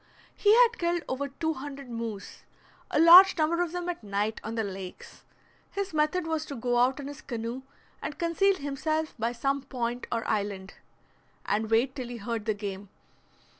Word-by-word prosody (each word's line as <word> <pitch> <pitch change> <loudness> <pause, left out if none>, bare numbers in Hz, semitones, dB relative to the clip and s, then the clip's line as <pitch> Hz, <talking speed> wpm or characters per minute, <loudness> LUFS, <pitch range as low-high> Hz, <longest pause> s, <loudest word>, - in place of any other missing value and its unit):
He 410 - +4
had 475 -1 +5
killed 345 -1 0
over 275 +2 -2
two 320 +4 -2
hundred 275 -1 -8
moose, 230 -4 -6 0.5
a - - +1
large 360 +4 +9
number 330 +2 +2
of 350 -2 -1
them 355 0 -4
at 350 -8 -4
night 205 +2 -2
on 220 +1 -5
the 225 - 0
lakes. 190 -2 -8 0.4
His 395 -3 -4
method 305 +3 +1
was 320 -1 -1
to 280 - -6
go 245 0 0
out 260 +3 +2
in 285 - -6
his 285 -1 -8
canoe 235 +1 -5 0.4
and 295 - -5
conceal 365 +4 +2
himself 310 +1 -2
by 230 +2 0
some 275 +3 -1
point 245 -2 -4
or 230 - -2
island, 200 -2 -2 0.7
and 215 +1 0
wait 235 +4 +2
till 255 -3 -5
he 240 0 -6
heard 225 0 -4
the 215 -2 0
game. 200 -1 -6
265 Hz, 180 wpm, -28 LUFS, 225-320 Hz, 0.7 s, large